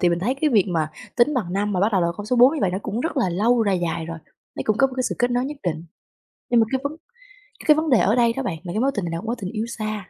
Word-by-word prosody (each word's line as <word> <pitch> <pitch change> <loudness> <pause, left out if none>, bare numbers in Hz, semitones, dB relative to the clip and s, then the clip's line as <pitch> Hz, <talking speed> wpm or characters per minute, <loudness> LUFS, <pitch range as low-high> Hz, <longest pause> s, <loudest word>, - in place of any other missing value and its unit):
thì 180 - +4
mình 170 0 +1
thấy 240 +9 0
cái 300 +2 0
việc 210 -7 +4
mà 160 -3 -1 0.3
tính 255 +5 +3
bằng 185 -8 -2
năm, 205 +1 -1
mà 185 - 0
bắt 210 +3 +2
đầu 190 - +3
là 170 - +2
con 205 0 -7
số 250 - 0
4 255 +6 +6
như 300 - -3
vậy, 190 - +2
nó 185 - -2
cũng 220 +2 -3
rất 320 +1 -3
là 240 -8 +2
lâu, 225 +7 +2
là 200 - +1
dài 170 -3 -1
rồi. 165 0 -6 0.4
Nấy - - -2
cũng 215 -1 +1
có 270 - +4
một 265 - -10
cái 255 - 0
sự - - -1
kết 245 +1 +2
nối 245 +1 +1
nhất 290 +2 -5
định. 165 -2 -3 0.7
Nhưng 240 -1 +5
mà 225 - +3
cái 265 - +1
vấn 300 +2 -3 0.7
cái 305 - +7
vấn 315 +1 -1
đề 245 -5 +5
ở 210 +4 +3
đây 235 -1 +3
đó 270 +2 -3
bạn 175 -9 -3
là 175 - -6
cái 215 - -1
mối 275 +1 +2
tình 205 - -2
này 170 - -4
nè, 165 - -2
mối 235 +2 -1
tình 185 - -4
yêu 220 0 -2
xa, 215 -4 -5
215 Hz, 340 wpm, -22 LUFS, 180-250 Hz, 0.7 s, cái